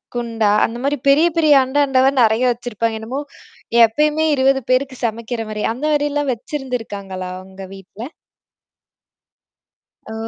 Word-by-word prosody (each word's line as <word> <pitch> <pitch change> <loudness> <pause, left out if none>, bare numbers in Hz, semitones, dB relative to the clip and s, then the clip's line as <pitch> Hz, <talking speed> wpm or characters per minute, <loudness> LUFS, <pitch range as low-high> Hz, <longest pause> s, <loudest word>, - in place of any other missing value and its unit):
குண்டா, 225 -3 0
அந்த 230 +1 -5
மாரி 285 +1 0
பெரிய, 305 +5 +5
பெரிய 310 -3 +5
அண்டா, 275 +3 0
அண்டவா 265 0 +3
நெறைய 220 +3 +2
வச்சிருப்பாங்க. 230 -2 -3
என்னமோ! 260 +6 -4 0.6
எப்பயுமே 300 +7 0
20 270 0 +2
பேருக்குச் 260 -1 -1
சமைக்கிற 230 +1 -3
மாரி! 210 0 -4
அந்த 270 +6 -5
மாரிலாம் 290 -1 0
வச்சிருந்திருக்காங்களா? 220 -8 -6
உங்க 190 0 -11
வீட்ல! 215 - -10 2.0
ஓ. - - -6
245 Hz, 125 wpm, -19 LUFS, 220-280 Hz, 2.0 s, பெரிய